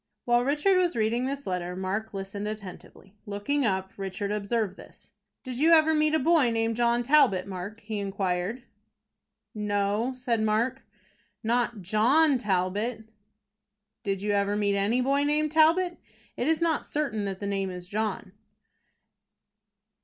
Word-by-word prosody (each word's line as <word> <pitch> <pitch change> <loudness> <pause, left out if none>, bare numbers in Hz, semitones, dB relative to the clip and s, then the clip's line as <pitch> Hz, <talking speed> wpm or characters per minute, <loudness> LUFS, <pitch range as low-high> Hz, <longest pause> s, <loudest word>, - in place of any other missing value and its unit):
While 240 0 +3
Richard 300 +8 +2
was 355 -2 +1
reading 230 +3 0
this 280 +1 -4
letter, 180 -1 -3
Mark 195 +4 -3
listened 195 +1 -5
attentively. 200 -2 -9
Looking 230 +7 -1
up, 190 -1 -1
Richard 195 +1 -4
observed 210 -1 -1
this. - - -16 0.3
"Did 255 -2 -6
you 325 +3 +5
ever 320 0 +5
meet 305 0 +2
with 315 - +2
a - - -4
boy 320 -7 +4
named 225 0 0
John 240 +1 +2
Talbot, 240 -9 +4
Mark?" 200 +3 -7
he 210 0 -4
inquired. 195 +3 -2 0.9
"No," 210 +3 0
said 245 -3 -1
Mark, 230 +5 0 0.6
"not 235 -2 0
John 255 - +3
Talbot." 210 +3 -1 0.9
"Did 195 -1 -2
you 210 - 0
ever 200 0 +1
meet 205 -1 +1
any 210 +5 +1
boy 275 +2 +2
named 300 +1 +1
Talbot? 335 +3 +3 0.4
It 245 - -2
is 320 +1 +2
not 325 -3 +1
certain 260 -9 -2
that 195 -1 -4
the 205 - -5
name 195 -1 -1
is 180 -1 -8
John." 210 -1 -3
220 Hz, 150 wpm, -27 LUFS, 200-265 Hz, 0.9 s, you